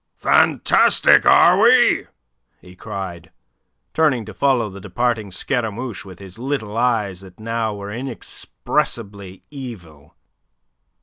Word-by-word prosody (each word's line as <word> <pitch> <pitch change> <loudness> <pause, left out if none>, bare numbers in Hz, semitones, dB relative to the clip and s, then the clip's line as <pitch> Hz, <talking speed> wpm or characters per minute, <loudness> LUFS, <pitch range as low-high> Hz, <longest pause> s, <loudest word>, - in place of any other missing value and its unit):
"Fantastic, - - +4
are - - +6
we?" - - +4 0.5
he 90 0 -16
cried, 95 -4 -7 0.6
turning 140 -8 +1
to 110 - -10
follow 125 0 +1
the 100 -1 -11
departing 120 -2 -2
Scaramouche 115 +1 -4
with 95 -3 -12
his 95 +2 -12
little 120 -5 -4
eyes 110 -6 0
that 95 0 -16
now 115 -1 -3
were 100 0 -8
inexpressibly 105 -4 -5
evil. 90 - -11
110 Hz, 110 wpm, -20 LUFS, 95-120 Hz, 0.6 s, are